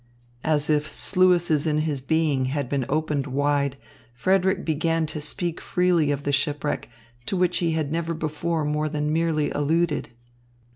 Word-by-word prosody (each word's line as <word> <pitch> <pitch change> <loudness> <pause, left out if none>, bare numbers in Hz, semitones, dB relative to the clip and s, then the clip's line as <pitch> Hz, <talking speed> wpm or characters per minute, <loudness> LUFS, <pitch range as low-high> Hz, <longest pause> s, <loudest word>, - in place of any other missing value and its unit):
As 150 -1 +2
if 150 -1 +1
sluices 175 -4 +3
in 155 0 +1
his 150 -4 -2
being 150 -2 +1
had 140 0 -2
been 135 -1 -1
opened 150 -1 -1
wide, 140 0 0 0.4
Frederick 190 +7 +1
began 165 +1 0
to 155 0 -5
speak 170 +3 -2
freely 180 -4 +2
of 145 -1 -1
the 145 - 0
shipwreck, 145 +1 -1 0.4
to 195 - 0
which 180 -1 +2
he 170 -2 0
had 155 -3 -1
never 165 0 -2
before 155 +1 -2
more 150 +1 0
than 150 0 -1
merely 160 -2 +1
alluded. 155 +2 0
155 Hz, 155 wpm, -24 LUFS, 145-165 Hz, 0.4 s, sluices